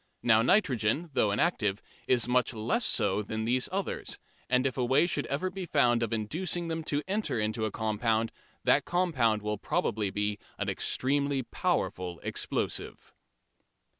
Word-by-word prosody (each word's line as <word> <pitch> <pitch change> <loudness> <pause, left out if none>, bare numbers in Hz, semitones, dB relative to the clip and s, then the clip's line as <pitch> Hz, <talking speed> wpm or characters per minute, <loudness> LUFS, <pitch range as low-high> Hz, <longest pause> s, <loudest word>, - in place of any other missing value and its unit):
Now 110 -2 +5
nitrogen, 140 - +2
though 105 - +2
inactive, 105 - +1 0.3
is 125 -2 +3
much 125 -1 +1
less 205 - 0
so 100 0 +3
than 110 +1 -4
these 125 +2 +1
others, 195 0 -3 0.3
and 125 +1 +3
if 135 - 0
a 130 - 0
way 130 +6 +4
should 150 -4 -1
ever 150 +7 -2
be 185 -1 -6
found 120 -6 +3
of 115 - -1
inducing 165 - -2
them 160 0 -3
to 145 0 -1
enter 200 - -1
into 110 +1 -1
a 110 - -2
compound, 110 +1 0 0.3
that - - +4
compound 130 - +1
will 105 -1 -2
probably 105 -2 -1
be 105 +1 -2 0.2
an - - -2
extremely 140 0 0
powerful 90 -6 -2
explosive. - - -3
120 Hz, 155 wpm, -29 LUFS, 110-155 Hz, 0.3 s, Now